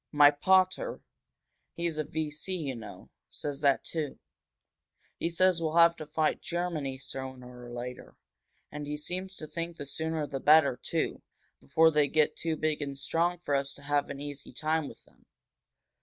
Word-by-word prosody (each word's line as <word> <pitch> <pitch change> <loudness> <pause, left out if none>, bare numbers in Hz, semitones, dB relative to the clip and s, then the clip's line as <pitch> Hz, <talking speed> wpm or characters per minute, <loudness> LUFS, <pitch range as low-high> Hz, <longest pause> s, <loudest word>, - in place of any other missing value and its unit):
"My 145 -1 +7
pater 185 +5 +2 0.8
he's 170 -2 -1
a - - +1
V. 155 0 -3
C., 170 +5 -2
you 140 -6 -3
know 115 -2 -10 0.2
says 145 -1 -5
that, 140 -2 +3
too. 155 -4 -3 1.0
He 165 - 0
says 180 0 +3
we'll 160 0 -1
have 170 0 +7
to 155 - -7
fight 155 0 0
Germany, 170 -6 -2
sooner 130 -2 -8
or - - -9
later. 125 +1 -7 0.6
And 150 -1 -6
he 150 0 -3
seems 185 +5 -4
to 155 - -7
think 170 +2 -5
the 145 - -6
sooner 160 +2 -2
the 135 -1 -4
better, 145 -2 +6
too, - - -1 0.4
before 160 - +4
they 150 -2 +3
get 155 +1 +2
too 165 -1 -2
big 155 -1 0
and 140 -1 -4
strong 165 +5 +1
for 145 - -2
us 140 0 0
to 140 - -13
have 145 0 +1
an 140 - -6
easy 145 -1 -7
time 155 -1 0
with - - -13
them." - - -26
150 Hz, 175 wpm, -30 LUFS, 140-165 Hz, 1.0 s, My